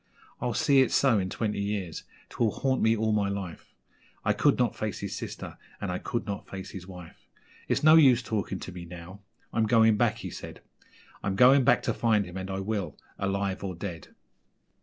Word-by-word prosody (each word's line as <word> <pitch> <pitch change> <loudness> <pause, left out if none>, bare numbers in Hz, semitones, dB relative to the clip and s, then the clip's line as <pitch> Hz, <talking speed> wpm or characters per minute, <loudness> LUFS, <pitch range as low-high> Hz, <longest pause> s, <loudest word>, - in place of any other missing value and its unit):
I'll 120 -3 -1
see 140 +3 +4
it 130 - +2
so 130 -6 +4
in 95 -1 -2
twenty 105 +1 -2
years, 100 -5 -3 0.2
'twill 115 - +1
haunt 130 +5 -1
me 110 +1 +3
all 110 0 +1
my 105 -2 +1
life 100 -4 -6 0.5
I - - +3
could - - +3
not - - +1
face - - -3
his - - -5
sister, - - -7 0.2
and 95 - -3
I 90 - -3
could 120 - -3
not 100 -1 -5
face 95 -1 -7
his 95 -2 -9
wife. 90 -3 -12 0.4
It's - - 0
no 155 +1 +8
use 130 -6 +6
talking 105 -4 -2
to - - -7
me 90 -1 -8
now 90 +3 -10 0.3
I'm 110 -1 +2
going 110 -1 +5
back,' - - +2
he - - -7
said, - - -9 0.6
'I'm 95 0 -1
going 130 +6 +6
back 125 -1 +4
to - - 0
find 110 -3 +2
him, 90 0 -10
and 95 0 -5
I 95 0 -3
will 95 -5 -3 0.2
alive 100 0 -1
or 95 -2 -4
dead!' 85 -2 -6
100 Hz, 200 wpm, -28 LUFS, 95-115 Hz, 0.6 s, no